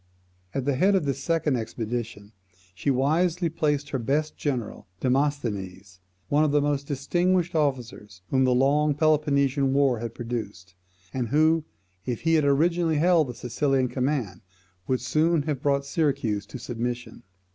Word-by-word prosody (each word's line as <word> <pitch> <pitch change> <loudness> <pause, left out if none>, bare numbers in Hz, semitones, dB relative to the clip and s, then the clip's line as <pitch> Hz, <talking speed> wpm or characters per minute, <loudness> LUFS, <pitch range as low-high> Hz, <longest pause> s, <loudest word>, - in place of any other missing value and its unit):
At 135 -2 -1
the 140 - +1
head 195 +9 +3
of 185 -6 +1
this 140 -1 -2
second 160 -5 +1
expedition 115 -2 -5 0.4
she 95 +10 -2
wisely 165 +6 +1
placed 150 -3 -1
her 135 - -1
best 145 +6 -1
general 125 -11 -4
Demosthenes, 115 -9 -2 0.3
one 150 +2 +3
of 155 - +2
the 145 +1 +3
most 145 -1 -1
distinguished 175 +5 0
officers 120 - -2
whom 130 -1 +3
the 130 -1 +3
long 145 +3 +3
Peloponnesian 140 -3 +2
war 135 -4 +2
had 115 0 -6
produced, 105 -7 -6 0.4
and 125 -3 -2
who, 155 +2 +3 0.4
if 120 0 -4
he 165 0 +1
had 155 -3 +3
originally 165 +3 +2
held 165 -1 +3
the 125 - -7
Sicilian 130 +1 0
command, 125 -7 -2 0.5
would 130 -1 0
soon 155 +4 +1
have 145 -3 -3
brought 140 -1 +1
Syracuse 135 -10 -1
to - - -8
submission. 120 0 -5
140 Hz, 150 wpm, -25 LUFS, 120-150 Hz, 0.5 s, head